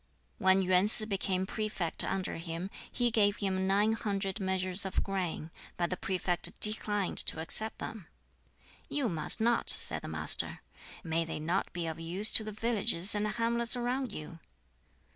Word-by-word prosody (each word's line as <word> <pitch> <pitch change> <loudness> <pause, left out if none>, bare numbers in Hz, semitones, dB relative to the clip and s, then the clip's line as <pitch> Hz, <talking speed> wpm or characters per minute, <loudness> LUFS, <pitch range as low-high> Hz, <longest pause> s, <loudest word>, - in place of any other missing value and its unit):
When 190 0 +3
Yuen 185 +1 +3
Sz 215 0 +8
became 190 -2 -2
prefect 195 -5 0
under 190 -3 -4
him, 165 +3 -6 0.2
he 240 -1 -1
gave 205 -3 +1
him 190 -2 -2
nine 205 +3 +2
hundred 200 -2 -4
measures 190 0 +2
of 190 -1 -1
grain, 180 -5 -4 0.3
but 175 0 -2
the - - -1
prefect 180 -1 -3
declined 210 -2 +1
to - - -1
accept 215 +7 +1
them. 210 -7 -8 0.8
"You 285 -4 -1
must 165 +5 +2
not," 235 +1 0
said - - +2
the - - -9
Master. - - +2 0.4
"May 165 -1 -1
they 165 -2 -6
not 170 +5 -2
be 175 -1 -5
of 160 0 -6
use 180 +6 +2
to 220 - +3
the 215 - -6
villages 215 -4 +2
and 210 0 -1
hamlets 235 +2 +1
around 245 0 -3
you?" 165 -2 -9
195 Hz, 160 wpm, -30 LUFS, 180-215 Hz, 0.8 s, Sz